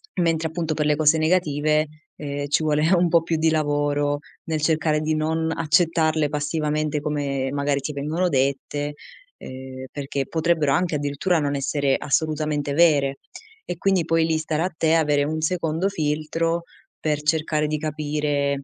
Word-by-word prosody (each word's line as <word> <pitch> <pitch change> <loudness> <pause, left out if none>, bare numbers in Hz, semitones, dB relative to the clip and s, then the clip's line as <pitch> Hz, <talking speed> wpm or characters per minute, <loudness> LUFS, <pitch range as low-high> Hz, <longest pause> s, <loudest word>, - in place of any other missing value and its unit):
mentre 165 -2 +1
appunto 165 -1 -2
per 150 0 -1
le 150 0 +3
cose 155 0 +4
negative, 155 -2 +2 0.3
ehm, 145 -1 -4
ci 150 +2 +1
vuole 155 +3 +2
un 175 -1 +4
po' 170 0 +4
più 165 -1 -1
di 160 +1 +3
lavoro 145 -1 0 0.2
nel 160 -1 -2
cercare 155 0 +2
di 155 0 0
non 160 +1 0
accettarle 160 -1 +2
passivamente 150 0 -1
come 140 -3 -2
magari 140 0 0
ti 140 +2 -4
vengono 155 +6 -1
dette, 140 +1 -1 0.4
ehm, 130 0 -9
perché 140 -1 -3
potrebbero 160 -3 +1
anche 170 +1 +1
addirittura 145 +5 0
non 145 -1 -1
essere 140 0 0
assolutamente 150 -1 -1
vere. 140 -4 +3 0.5
E 175 - -4
quindi 190 0 +2
poi 165 0 +2
lì 160 -1 +1
starà 155 +1 -1
a 185 - -4
te 160 0 +3
avere 150 -3 +2
un 155 +2 -2
secondo 165 +1 0
filtro, 165 0 -1 0.4
per 150 -1 -1
cercare 155 0 +1
di 155 0 -1
capire, 145 -2 -1
155 Hz, 160 wpm, -23 LUFS, 145-160 Hz, 0.5 s, cose